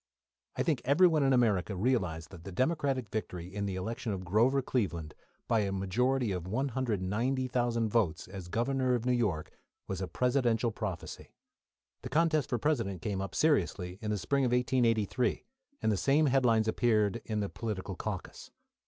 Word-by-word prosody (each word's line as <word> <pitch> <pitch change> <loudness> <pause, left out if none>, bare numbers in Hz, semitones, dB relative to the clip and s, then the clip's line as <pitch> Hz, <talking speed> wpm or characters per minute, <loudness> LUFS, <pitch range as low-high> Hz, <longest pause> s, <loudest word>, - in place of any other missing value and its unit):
I - - 0
think 150 -7 0
everyone 160 +2 +4
in 135 -1 +3
America 110 -6 +2
realised 95 -7 -1
that 85 -4 -11
the 95 - -7
Democratic 135 - 0
victory 90 -4 -5
in 100 0 -2
the 95 - -3
election 110 +4 -3
of 95 -2 -4
Grover 120 +9 +3
Cleveland, 85 -12 -2 0.3
by 115 - +3
a 100 -2 0
majority 120 +6 0
of 90 -2 -3
190,000 120 +1 0
votes, 100 -8 0
as 95 -2 -8
Governor 125 +5 +1
of 120 -1 -3
New 125 - +2
York, 105 -11 0 0.4
was 95 -1 -4
a 95 - -2
presidential 125 -2 +1
prophecy. 105 -5 -6 0.7
The 125 - -6
contest 155 -1 +2
for 120 - +1
President 115 - -1
came 100 -3 -2
up, 95 -1 -5
seriously, 95 - +1
in 110 - -3
the 105 - 0
spring 135 +9 0
of 125 - +1
1883, 120 -2 +1 0.4
and 110 - +3
the 105 - +1
same 145 +8 +3
headlines 125 -5 +3
appeared 110 -1 +2
in 110 -1 -2
the 100 - -1
political 100 -4 -4
caucus. 95 0 -6
115 Hz, 165 wpm, -31 LUFS, 95-130 Hz, 0.7 s, everyone